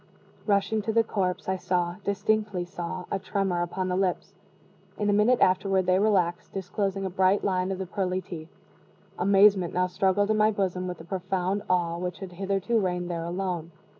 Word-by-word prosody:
Rushing 205 +1 +2
to 220 +2 -2
the 230 +1 +4
corpse, 185 -4 -2
I 190 0 0
saw 175 -1 -1
distinctly 205 -2 0
saw 175 0 -5
a - - 0
tremor 190 -2 -1
upon 185 +2 -2
the 180 - 0
lips. 185 -1 -1 0.6
In 205 -1 +1
a - - +2
minute 215 +5 +4
afterward 190 0 +3
they 185 +1 +3
relaxed, 185 -5 +1
disclosing 195 +1 -2
a - - -1
bright 190 +2 +2
line 185 -1 0
of 190 - -2
the 190 - -4
pearly 185 0 -1
teeth. 170 -3 -8 0.7
Amazement 195 -1 +4
now 180 0 +3
struggled 190 +3 +1
in 215 - +2
my 215 0 +5
bosom 185 -3 -1
with 180 -1 -5
the - - -11
profound 190 +1 -2
awe 170 -2 +1
which 180 0 -4
had 190 -2 -8
hitherto 195 +5 0
reigned 180 -2 -1
there 165 -1 -3
alone. 175 -2 -3
190 Hz, 185 wpm, -27 LUFS, 180-200 Hz, 0.7 s, my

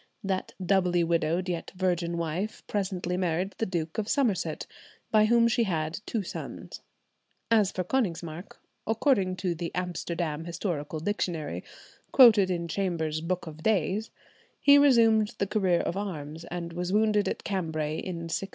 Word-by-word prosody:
That 190 -1 -2
doubly 180 -2 +3
widowed 170 +2 0
yet 175 -2 -4
virgin 175 -2 0
wife 170 +6 -3
presently 185 -3 -2
married 180 +2 -1
the 225 - 0
Duke 165 -1 -3
of 210 - -2
Somerset, 230 - 0 0.5
by 215 -1 +5
whom 235 +1 +4
she 235 0 +2
had 160 -3 -2
two 220 -3 -1
sons. - - -7 0.7
As 210 -4 +4
for 185 - -2
Konigsmark, 175 -6 -2 0.3
according 220 -5 +2
to 180 -1 -1
the 170 0 -4
"Amsterdam 170 -3 -3
Historical 165 -3 -3
Dictionary," 170 -4 -2 0.5
quoted 220 -7 +7
in 170 -2 -1
Chambers's 165 -4 -1
"Book 180 +2 -2
of 160 -1 -9
Days," 205 +2 +1 0.5
he 285 0 +7
resumed 230 -5 +4
the - - +1
career 190 -4 +2
of 170 - -2
arms, 165 -5 -5
and 170 -1 -5
was 180 +1 -3
wounded 210 0 +3
at - - -4
Cambray 160 -5 -2
in 175 -3 -5
1683. 180 +4 -3
180 Hz, 150 wpm, -28 LUFS, 170-205 Hz, 0.7 s, quoted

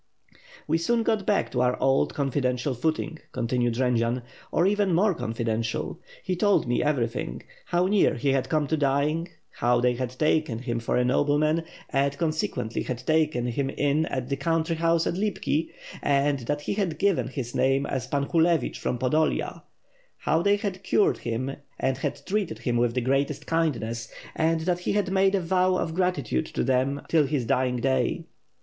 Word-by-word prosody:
"We 165 - +2
soon 230 +7 +1
got 220 -3 0
back 205 - +1
to 125 - 0
our 125 0 +1
old 135 0 +2
confidential 135 -1 0
footing," 160 +4 -2
con 120 -2 -2
tinued 120 -1 +1
Jendzian, 120 -1 +1 0.3
"or 170 - +2
even 200 -2 +2
more 200 +3 +3
confidential. 115 -5 -2 0.2
He 185 - -1
told 205 +3 +3
me 120 - +1
everything; 120 - -1 0.2
how 175 +1 +1
near 200 +1 +3
he 140 +4 -1
had 135 -1 +1
come 155 -2 +1
to 160 - +2
dying; 145 +4 +1 0.3
how 120 0 +3
they 125 0 +3
had 125 0 -4
taken 155 -5 +1
him 120 -1 -3
for 115 - -1
a 125 - +2
nobleman 150 +5 +2 0.3
and, 140 0 +1
consequently, 155 -8 -1
had 125 0 -5
taken 155 -6 +2
him 135 +3 -1
in 145 +3 +1
at 130 -2 -3
the 140 - -1
country 165 +3 0
house 165 0 +2
at - - 0
Lipki, 175 -5 -1 0.3
and 140 0 +2
that 145 0 -1
he - - -2
had 190 -6 -1
given 200 +1 +1
his 125 -2 -5
name 135 +1 +2
as 130 -4 -3
Pan 140 -1 0
Hulevich 165 -3 +1
from 125 - -1
Podolia, 150 +6 0 0.6
how 160 +2 +1
they 200 +3 +4
had 200 -2 -4
cured 200 +1 +2
him 125 +4 -3 0.2
and 130 -1 0
had - - -4
treated 195 - -1
him 120 +1 -1
with 120 0 +1
the 125 - +1
greatest 135 +3 0
kindness,, 120 -9 -1 0.2
and 160 0 +1
that 175 +1 0
he 180 - -1
had 200 -2 0
made 195 +1 +3
a 195 - +1
vow 185 +2 +2
of 165 -3 -1
gratitude 160 - 0
to - - -2
them 135 +2 +1
till 155 -4 +3
his 135 -4 -1
dying 125 +2 +1
day." 130 +2 0
145 Hz, 180 wpm, -26 LUFS, 125-165 Hz, 0.6 s, they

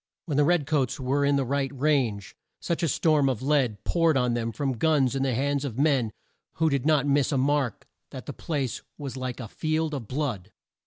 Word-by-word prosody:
When 150 - -2
the 145 - +5
red 165 -1 +2
coats 140 -1 0
were 135 +2 0
in 140 0 +3
the 135 -1 +1
right 135 +1 -1
range, 130 -9 0 0.2
such 170 - -2
a 170 - +2
storm 150 -2 +2
of 130 -2 -3
lead 130 -8 +1
poured 165 -4 +2
on 125 -2 +1
them 115 -1 -1
from 135 -1 -2
guns 145 -5 +2
in 135 - -1
the 135 -3 +1
hands 140 +2 0
of 125 -5 -4
men 135 -6 +2 0.4
who 160 -1 +1
did 140 0 0
not 150 -2 +3
miss 145 0 +2
a 140 - +1
mark 135 -3 0 0.2
that - - -9
the - - -6
place 140 -7 -3 0.2
was 140 -4 -6
like 130 -1 -4
a 115 - -6
field 155 +5 -1
of 130 -7 -5
blood. 125 -8 -3
140 Hz, 215 wpm, -26 LUFS, 125-150 Hz, 0.4 s, the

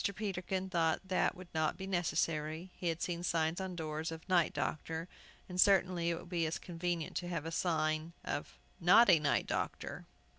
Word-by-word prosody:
Peterkin 190 -2 -2
thought 170 0 +1
that 185 - +1
would 180 -1 -12
not 155 -1 +1
be 190 - -5
necessary. 165 -2 -1
He 175 - -4
had 165 0 -1
seen 170 -1 -2
signs 165 0 0
on 190 -1 -4
doors 160 -1 -3
of 160 +1 -8
"Night 180 -3 +3
Doctor," 160 +2 -3 0.4
and 180 0 +1
certainly 185 -3 +4
it 170 - 0
would - - -10
be 170 -3 0
as 160 - -2
convenient 175 -1 -3
to 175 - -3
have 165 -3 -3
a 165 - -3
sign 160 -1 0
of - - -4 0.2
"Not 195 +5 +7
a 165 - +6
Night 145 -2 +1
Doctor." - - -3
170 Hz, 185 wpm, -34 LUFS, 160-185 Hz, 0.4 s, Not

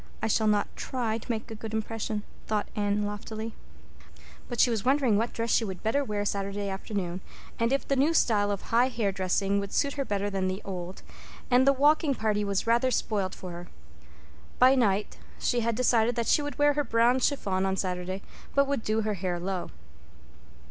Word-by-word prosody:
I - - -2
shall 220 0 +2
not 210 -1 +1
try 230 -4 -2
to 230 - -14
make 225 0 -4
a - - -3
good 220 0 -6
impression," 220 -1 -3 0.2
thought 210 -1 0
Anne 205 0 0
loftily. 215 +2 -5 1.0
But 240 - -4
she 245 - +5
was 220 -3 -1
wondering 260 -3 +3
what 225 +3 0
dress 230 0 -2
she - - +3
would 190 -4 -6
better 255 +6 +1
wear 210 -5 -2
Saturday 200 0 -2
afternoon, 190 -2 -4 0.4
and 230 +1 +2
if 275 - 0
the 275 - +2
new 280 +4 +3
style 205 -8 +3
of 200 -2 -2
high 240 +2 +3
hair 230 -6 -1
dressing 195 +1 0
would 200 0 -5
suit 280 -1 +1
her 280 - -1
better 205 -4 -1
than 195 -2 -1
the 185 +1 -2
old; 185 -1 -6 0.5
and 255 +2 +5
the - - +8
walking 290 +1 +3
party 210 -2 0
was 200 -1 -1
rather 235 +3 +3
spoiled 205 -5 -1
for 185 - -8
her. 175 +1 -8 0.9
By 255 +1 +7
night 210 -6 +1 0.2
she 245 - 0
had 230 -1 0
decided 235 -1 +3
that 235 -1 -1
she 295 - +3
would 290 0 -5
wear 290 0 +4
her 290 0 0
brown 235 +1 +3
chiffon 200 -9 0
on 190 0 0
Saturday, 185 +1 -3 0.3
but 280 0 +5
would 280 -4 -1
do 215 +1 +1
her 215 0 -1
hair 180 -2 -2
low. 185 0 -3
220 Hz, 200 wpm, -28 LUFS, 200-245 Hz, 1.0 s, the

